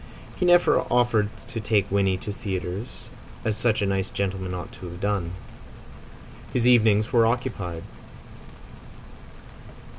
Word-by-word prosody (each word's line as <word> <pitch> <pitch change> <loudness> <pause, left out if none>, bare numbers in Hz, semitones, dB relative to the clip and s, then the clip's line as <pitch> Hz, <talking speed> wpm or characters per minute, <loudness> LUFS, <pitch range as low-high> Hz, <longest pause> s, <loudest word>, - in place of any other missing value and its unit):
He 180 - 0
never 175 0 +5
offered 120 -4 +2 0.2
to 115 - -4
take 105 -2 +1
Winnie 95 -2 +2
to 105 - -6
theatres, 95 +2 -5 0.4
as 110 -2 +1
such 110 -2 +1
a - - +2
nice 95 -1 -1
gentleman 95 -2 -3
ought 90 -2 -6
to 90 - -10
have 85 0 -9
done. 100 -4 -1 1.2
His 125 -1 +1
evenings 110 -2 +4
were 115 -2 +5
occupied. 115 -9 -2
105 Hz, 125 wpm, -25 LUFS, 95-115 Hz, 1.2 s, never